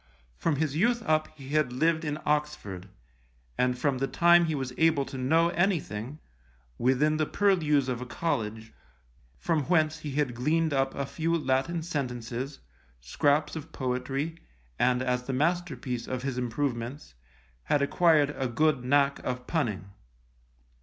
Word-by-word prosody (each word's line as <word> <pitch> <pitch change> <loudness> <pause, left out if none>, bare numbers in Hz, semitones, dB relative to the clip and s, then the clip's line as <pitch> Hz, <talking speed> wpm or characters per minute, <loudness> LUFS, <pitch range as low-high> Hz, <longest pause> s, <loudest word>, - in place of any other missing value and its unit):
From 160 - 0
his 150 -1 -1
youth 235 +7 +2
up 155 0 +2
he 135 -2 -10
had 150 -3 +1
lived 160 +5 +1
in 150 -1 -2
Oxford, 145 -11 -2 0.7
and 125 0 +1
from 130 0 0
the 135 - 0
time 175 +2 +5
he 160 -2 -1
was 130 -2 -4
able 160 -4 +3
to 135 - -9
know 160 +6 +3
anything, 155 - -1 0.6
within 140 +5 +2
the 155 -1 0
purlieus 155 -9 +2
of 125 -1 -2
a 125 - -6
college, 110 -6 -3 0.6
from 160 -5 0
whence 155 -1 +2
he 150 -2 -6
had 145 -3 0
gleaned 155 +6 +1
up 135 -1 0
a 140 - -2
few 165 +4 -1
Latin 155 +3 0
sentences, 130 -3 -4 0.4
scraps 145 - +1
of 160 - -7
poetry, 135 +5 -2 0.4
and 125 0 +2
as 125 -1 0
the 135 - -3
masterpiece 140 -5 -1
of 130 0 -4
his 135 -2 -2
improvements, 125 - -3 0.5
had 145 -1 +2
acquired 150 -1 +3
a 130 - -1
good 140 +2 +1
knack 140 +2 +2
of 125 0 -4
punning. 105 - -2
140 Hz, 150 wpm, -28 LUFS, 125-155 Hz, 0.7 s, time